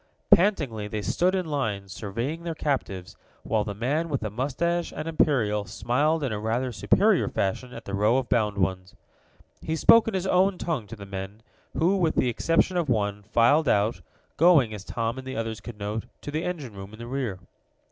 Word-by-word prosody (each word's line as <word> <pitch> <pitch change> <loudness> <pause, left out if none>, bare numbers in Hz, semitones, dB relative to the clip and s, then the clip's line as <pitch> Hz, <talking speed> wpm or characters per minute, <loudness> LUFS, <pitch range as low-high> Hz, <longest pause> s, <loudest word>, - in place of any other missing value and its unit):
Pantingly 145 - +3
they 105 0 -4
stood 180 - +1
in 185 -1 -1
line, 110 -10 -2
surveying 115 - -4
their 170 -1 -4
captives, 100 - -3 0.3
while 110 -2 0
the 105 -1 -5
man 145 +10 -1
with 140 -4 -1
the 110 -2 -3
mustache 160 - -1
and 155 +2 -6
imperial 120 -10 +2
smiled 145 - 0
in 135 - -1
a 105 - -2
rather 120 +4 -1
superior 115 - +3
fashion 110 +6 -2
at - - -9
the 100 - -6
row 105 +5 +3
of 130 -2 -1
bound 105 -3 +1
ones. 95 0 -1 0.7
He 160 - -2
spoke 230 +8 +6
in 225 - -1
his 190 0 -1
own 190 0 +3
tongue 150 -13 -3
to 115 - -8
the 100 -2 -10
men, 100 +2 -7 0.3
who, 180 +5 +3
with 165 -4 +1
the 125 - +2
exception 165 - +1
of 165 -5 0
one, 105 -3 0
filed 120 +9 +3
out, 105 -1 +1 0.4
going, 155 -9 +5
as 105 -2 -7
Tom 115 +4 -3
and 130 - -9
the 130 - -5
others 115 -1 -3
could 120 -3 -9
note, 105 +2 -4 0.2
to 145 - -6
the 155 +3 -2
engine 150 -10 -4
room 100 +1 -9
in - - -10
the 115 - -8
rear. 125 -6 -3
120 Hz, 200 wpm, -26 LUFS, 105-155 Hz, 0.7 s, spoke